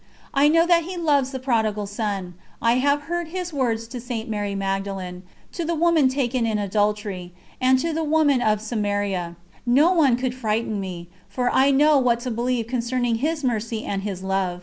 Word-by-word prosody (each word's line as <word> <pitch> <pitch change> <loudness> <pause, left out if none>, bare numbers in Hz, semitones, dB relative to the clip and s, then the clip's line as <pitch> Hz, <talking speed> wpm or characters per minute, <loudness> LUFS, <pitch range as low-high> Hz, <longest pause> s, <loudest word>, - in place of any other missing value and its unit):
I 280 +1 +4
know 330 +2 +4
that 340 -2 +3
He 365 +1 -6
loves 290 -6 +2
the 270 - -5
Prodigal 220 -5 0
Son, 200 -3 -3 0.3
I 235 +1 +3
have 285 +2 +2
heard 345 +2 -3
His 355 0 -5
words 235 -5 0
to 245 -1 -6
St. 235 -2 -5
Mary 205 -2 -2
Magdalen, 195 -2 -3 0.3
to 345 - -4
the 335 +1 -1
woman 325 -4 +3
taken 255 -2 0
in 220 -1 0
adultery, 205 -3 -1 0.3
and 260 0 +4
to 330 +5 -1
the 320 +1 -1
woman 300 -4 +3
of 215 -2 +1
Samaria. 205 -5 -2 0.3
No 275 +8 +4
one 290 -8 +4
could 250 0 -2
frighten 220 -3 -1
me, 180 -3 -6 0.2
for 245 +5 -1
I 270 +1 +4
know 290 +1 +5
what 240 -2 +2
to 250 - -3
believe 240 0 -1
concerning 240 0 -1
His 305 +4 -1
Mercy 225 -2 -2
and 195 -1 -2
His 195 -2 -5
Love. 190 -2 -1
240 Hz, 190 wpm, -23 LUFS, 205-280 Hz, 0.3 s, know